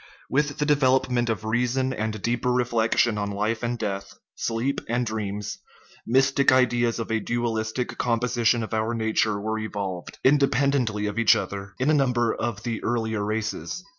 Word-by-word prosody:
With 145 Hz, +3 st, +1 dB
the 150 Hz, -, 0 dB
development 130 Hz, -4 st, +2 dB
of 110 Hz, -1 st, -2 dB
reason 125 Hz, +3 st, 0 dB
and 110 Hz, -2 st, -3 dB
deep 120 Hz, +1 st, -1 dB
er -, -, +3 dB
reflection 120 Hz, -2 st, +2 dB
on 100 Hz, 0 st, -2 dB
life 105 Hz, +3 st, -1 dB
and 120 Hz, 0 st, -2 dB
death, 100 Hz, -3 st, -4 dB, 0.2 s
sleep 120 Hz, +4 st, -2 dB
and 120 Hz, +1 st, +1 dB
dreams, 105 Hz, -2 st, -4 dB, 0.5 s
mystic 135 Hz, +3 st, +4 dB
ideas 120 Hz, -2 st, +3 dB
of 115 Hz, -1 st, -4 dB
a 110 Hz, -, +2 dB
dualistic 115 Hz, +1 st, -2 dB
composition 120 Hz, -1 st, +1 dB
of 110 Hz, -, -6 dB
our 110 Hz, +2 st, 0 dB
nature 110 Hz, -2 st, +1 dB
were 110 Hz, +2 st, -2 dB
evolved 100 Hz, -4 st, -5 dB
independently 135 Hz, -5 st, +2 dB
of 105 Hz, +2 st, -2 dB
each 115 Hz, -, +6 dB
other 100 Hz, 0 st, -5 dB
in 135 Hz, +4 st, +2 dB
a -, -, +3 dB
number 125 Hz, -5 st, +2 dB
of 110 Hz, -3 st, -3 dB
the 115 Hz, -2 st, -3 dB
earlier 110 Hz, -3 st, -1 dB
races. 110 Hz, +11 st, -3 dB
115 Hz, 165 wpm, -25 LUFS, 110-125 Hz, 0.5 s, each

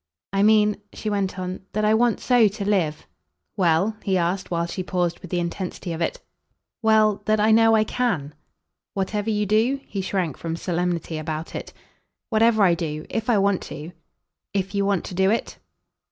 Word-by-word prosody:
"I 195 Hz, -, +2 dB
mean," 210 Hz, 0 st, +4 dB, 0.2 s
she 215 Hz, -, -4 dB
went 195 Hz, -2 st, -1 dB
on, 185 Hz, 0 st, -4 dB
"that 215 Hz, 0 st, +1 dB
I 215 Hz, -, +4 dB
want 235 Hz, 0 st, +2 dB
so 245 Hz, -3 st, +4 dB
to 200 Hz, 0 st, -4 dB
live 170 Hz, -7 st, 0 dB, 0.3 s
!" -, -, -54 dB
"Well?" 185 Hz, +2 st, +2 dB
he 190 Hz, -2 st, +1 dB
asked 180 Hz, +2 st, -1 dB
while 170 Hz, -1 st, 0 dB
she 170 Hz, +2 st, -4 dB
paused 175 Hz, -2 st, -1 dB
with 185 Hz, -, -10 dB
the 175 Hz, -, 0 dB
intensity 175 Hz, 0 st, -4 dB
of 165 Hz, -, -5 dB
it. 165 Hz, -, -1 dB, 0.6 s
"Well, 215 Hz, -2 st, +3 dB
that 215 Hz, 0 st, +2 dB
I 215 Hz, +1 st, +4 dB
know 225 Hz, 0 st, +6 dB
I 215 Hz, -, +4 dB
CAN." 200 Hz, -, -1 dB, 0.6 s
"Whatever 205 Hz, +2 st, -1 dB
you 210 Hz, -1 st, +1 dB
do?" 225 Hz, +7 st, +2 dB
He 195 Hz, -, -4 dB
shrank 185 Hz, -6 st, -2 dB
from 165 Hz, -1 st, -4 dB
solemnity 170 Hz, -2 st, -2 dB
about 155 Hz, +1 st, -5 dB
it. -, -, -6 dB, 0.6 s
"Whatever 220 Hz, -1 st, +4 dB
I 180 Hz, -3 st, +5 dB
do. 155 Hz, -2 st, -3 dB
If 225 Hz, +1 st, -2 dB
I 230 Hz, -, +4 dB
want 200 Hz, -1 st, +2 dB
to." 155 Hz, +4 st, -7 dB, 0.6 s
"If 195 Hz, 0 st, -1 dB
you 200 Hz, 0 st, +1 dB
want 200 Hz, -3 st, 0 dB
to -, -, -7 dB
do 190 Hz, +2 st, +3 dB
it?" 225 Hz, -, -1 dB
195 Hz, 190 wpm, -23 LUFS, 175-215 Hz, 0.6 s, know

